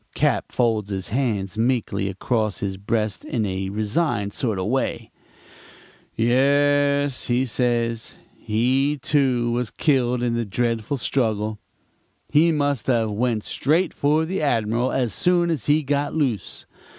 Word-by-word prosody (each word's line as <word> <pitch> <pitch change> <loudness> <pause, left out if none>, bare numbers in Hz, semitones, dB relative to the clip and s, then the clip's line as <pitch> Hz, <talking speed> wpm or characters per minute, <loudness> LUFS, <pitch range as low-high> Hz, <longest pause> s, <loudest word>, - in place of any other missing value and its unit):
"Cap. - - 0
folds 110 -4 0
his 95 -2 -3
hands 110 -5 -1
meekly 115 -5 0
across 110 +2 -1
his 95 -1 -3
breast 105 +1 -2
in 110 -3 -2
a 95 0 -3
resigned 105 - -1
sort 110 -6 -1
of 95 - -2
way. 130 +6 -2 1.0
"'Yes,' 140 +3 +2 0.2
says 115 -2 -1 0.2
he; 130 +6 +1
'he, - - -12
too, 130 -4 +1
was 120 -1 -1
killed 125 -4 +1
in 120 -1 0
the 115 0 0
dreadful 115 +4 -1
struggle. 110 -5 -1 0.7
He 160 +3 +5
must 145 -6 -1
have 115 -4 +1
went 110 0 0
straight 165 +6 0
for 150 +3 +1
the 185 +2 -3
Admiral 120 -2 +1
as 125 -6 0
soon 175 - +2
as 150 -9 -3
he 150 +1 +3
got 145 +2 -1
loose. 135 -9 -2
120 Hz, 140 wpm, -23 LUFS, 110-140 Hz, 1.0 s, He